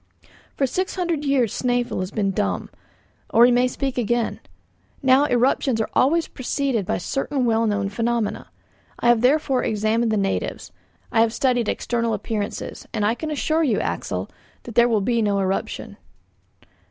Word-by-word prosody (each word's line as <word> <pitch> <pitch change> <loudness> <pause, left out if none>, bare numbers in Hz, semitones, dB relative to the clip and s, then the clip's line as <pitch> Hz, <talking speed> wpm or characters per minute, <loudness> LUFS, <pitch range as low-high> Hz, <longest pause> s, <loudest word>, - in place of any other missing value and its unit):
"For 275 - +1
six 370 +8 -2
hundred 345 -5 -1
years 260 -6 +2
Snæfell 245 -3 -1
has 185 0 -3
been 200 -1 -1
dumb; 95 - -2 0.6
but 230 - +4
he 245 - +7
may 245 +1 +3
speak 265 0 -3
again. 240 0 0 0.6
Now, 265 +2 +5
eruptions 250 -1 +1
are 220 - -2
always 325 +6 +3
preceded 260 -5 -2
by - - 0
certain 270 +7 -2
well 225 -1 +2
known 205 -1 0
phenomena. 230 +1 -2 0.5
I 240 - +2
have 240 -2 +4
therefore 270 0 +2
examined 220 +2 +1
the 215 - +1
natives, 195 -1 -2 0.4
I 225 - +3
have 225 -1 +2
studied 245 -4 +1
external 235 -1 -1
appearances, 210 -2 -4
and 210 -2 -1
I 215 - +3
can 310 +6 -5
assure 310 +2 0
you, 255 -10 +2
Axel, - - -3 0.4
that 235 - -9
there 235 +2 +5
will 220 -3 +2
be 235 +3 +1
no 205 -2 +1
eruption." 190 0 -3
240 Hz, 165 wpm, -22 LUFS, 215-265 Hz, 0.6 s, he